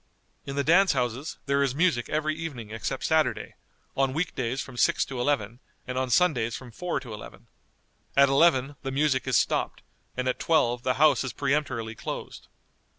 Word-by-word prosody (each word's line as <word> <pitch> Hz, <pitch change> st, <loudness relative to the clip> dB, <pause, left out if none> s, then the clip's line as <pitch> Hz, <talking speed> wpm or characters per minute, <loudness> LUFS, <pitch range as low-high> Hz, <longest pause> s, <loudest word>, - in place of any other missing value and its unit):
In 140 Hz, -, -4 dB
the 140 Hz, -, +1 dB
dance 180 Hz, +5 st, +5 dB
houses 125 Hz, +2 st, -2 dB
there 140 Hz, 0 st, +1 dB
is 135 Hz, -2 st, 0 dB
music 155 Hz, -7 st, +1 dB
every 155 Hz, 0 st, 0 dB
evening 140 Hz, -10 st, -6 dB
except 115 Hz, +4 st, -4 dB
Saturday; 160 Hz, -1 st, +1 dB, 0.4 s
on 135 Hz, -1 st, +1 dB
week 165 Hz, 0 st, -1 dB
days 125 Hz, +1 st, -2 dB
from 135 Hz, -2 st, -6 dB
six -, -, +2 dB
to 130 Hz, -2 st, -5 dB
eleven, 120 Hz, -4 st, -1 dB, 0.3 s
and 125 Hz, -, -5 dB
on 130 Hz, 0 st, -1 dB
Sundays 125 Hz, -7 st, +2 dB
from 125 Hz, -2 st, -9 dB
four 175 Hz, +5 st, -3 dB
to 125 Hz, -4 st, -9 dB
eleven. 105 Hz, -, -10 dB, 0.7 s
At 140 Hz, 0 st, +7 dB
eleven 140 Hz, -1 st, +3 dB
the 135 Hz, -, -4 dB
music 135 Hz, -1 st, +1 dB
is 130 Hz, -, +3 dB
stopped, -, -, 0 dB, 0.3 s
and 130 Hz, 0 st, -1 dB
at 130 Hz, -, -1 dB
twelve 125 Hz, -7 st, +2 dB
the 125 Hz, 0 st, 0 dB
house 145 Hz, -2 st, +4 dB
is 130 Hz, -, -4 dB
peremptorily 130 Hz, -6 st, -1 dB
closed. -, -, -7 dB
135 Hz, 180 wpm, -27 LUFS, 125-150 Hz, 0.7 s, At